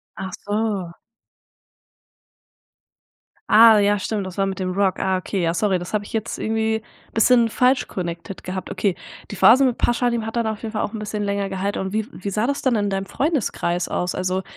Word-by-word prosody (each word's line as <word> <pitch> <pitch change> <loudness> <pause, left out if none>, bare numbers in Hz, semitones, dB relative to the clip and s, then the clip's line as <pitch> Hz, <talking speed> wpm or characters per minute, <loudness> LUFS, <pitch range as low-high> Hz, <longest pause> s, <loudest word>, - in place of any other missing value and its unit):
Ach 190 0 -6
so. 205 -4 -1 2.6
Ah 225 0 +8
ja 205 0 +3
stimmt, 200 0 -3
das 185 +1 -9
war 195 - +2
mit 195 0 -4
dem 185 -1 -2
Rock, 190 0 +1
ah 190 0 +1
okay, 185 +1 -2
ja 165 -1 +1
sorry, 190 0 +1
das 175 +3 -8
hab 210 -1 0
ich - - -12
jetzt 220 -1 -3
irgendwie 220 0 -1 0.3
bisschen 235 +1 +4
falsch 250 +3 +2
connected 170 0 -6
gehabt 185 +1 -5
okay. 200 -3 0 0.4
Die 205 - -6
Phase 255 +4 +7
mit 250 -3 +2
Pashanim 240 -1 +1
hat 225 +1 -5
dann 235 - +1
auf 220 -1 -3
jeden 225 -1 -5
Fall 215 - -1
auch - - -2
'n 220 - -4
bisschen 210 0 -3
länger 200 0 -1
gehalt 195 +1 -2
und 190 +1 -3
wie 220 0 0
wie 200 - -6
sah 210 +3 0
das 280 +2 -1
dann 260 -3 +2
in 205 -2 0
deinem 195 0 -2
Freundeskreis 205 - -1
aus? 180 0 -2
Also 185 +1 -1
205 Hz, 200 wpm, -22 LUFS, 190-225 Hz, 2.6 s, Ah